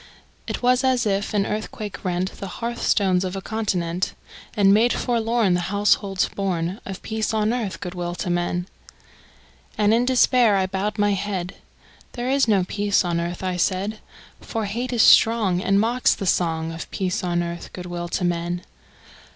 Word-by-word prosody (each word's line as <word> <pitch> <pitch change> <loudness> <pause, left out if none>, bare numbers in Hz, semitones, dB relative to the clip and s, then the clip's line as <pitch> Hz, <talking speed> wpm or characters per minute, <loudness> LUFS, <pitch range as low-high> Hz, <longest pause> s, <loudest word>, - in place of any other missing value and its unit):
It - - -4
was 250 +1 +3
as 255 -2 +2
if 200 0 0
an 205 -2 +1
earthquake 210 -1 -5
rent 180 +1 -1
The 195 - -8
hearth 235 0 -4
stones 185 -3 +2
of 185 0 -3
a - - -3
continent, 185 -5 -2 0.4
And 200 -2 +5
made 230 +4 +4
forlorn 230 -4 +1
The 175 - +2
households 200 -1 +2
born 185 -1 -2
Of 195 -1 -7
peace 220 0 -2
on 215 +1 +1
earth, 205 -8 -3
good 180 - -6
will 175 -1 -4
to 175 - -3
men! 175 0 -1 1.1
And 210 0 +3
in 235 +2 +3
despair 250 -3 +4
I 190 -1 +2
bowed 195 +3 -2
my 205 0 +2
head; 190 -3 -3 0.6
"There 245 +1 -2
is 275 -2 +3
no 200 -4 +3
peace 205 +1 +1
on 170 -1 0
earth," 170 +2 -4
I 185 -1 -1
said: 195 +4 -1 0.4
"For 225 -2 -4
hate 235 +5 -3
is 235 -3 +3
strong, 215 -6 +5
And 195 +1 +2
mocks 235 +4 +2
the 195 - -5
song 165 -3 0
Of 165 0 -7
peace 185 +1 -2
on 175 -1 0
earth, 170 0 -6
good 180 - -8
will 175 -1 -4
to 175 - -2
men!" 175 0 -1
195 Hz, 180 wpm, -23 LUFS, 180-220 Hz, 1.1 s, And